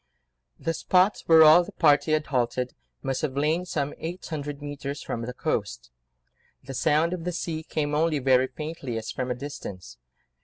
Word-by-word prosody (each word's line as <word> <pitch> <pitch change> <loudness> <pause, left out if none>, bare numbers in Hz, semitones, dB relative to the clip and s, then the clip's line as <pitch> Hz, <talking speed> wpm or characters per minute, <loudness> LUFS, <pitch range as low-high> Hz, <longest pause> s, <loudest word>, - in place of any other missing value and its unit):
The 165 - -2
spot 185 +5 +2
where 160 -1 +8
all 155 +3 +8
the - - -11
party 155 -1 +3
had 155 0 +1
halted 125 -1 -1 0.3
must 135 -1 -2
have 140 -3 -2
lain 155 +5 +1
some 145 -3 -2
eight 175 +3 -6
hundred 145 -2 -5
mètres 145 -1 -6
from 115 - -3
the 120 +2 -4
coast; - - -3 0.7
the 135 +1 -7
sound 155 +5 +2
of 175 -2 -4
the 180 - -2
sea 165 -2 -3
came 150 -2 -2
only 155 +1 +2
very 130 -1 +3
faintly, 150 -5 -5
as 115 - -4
from 130 -1 -3
a 125 - -1
distance. 100 - -8
145 Hz, 180 wpm, -26 LUFS, 130-160 Hz, 0.7 s, where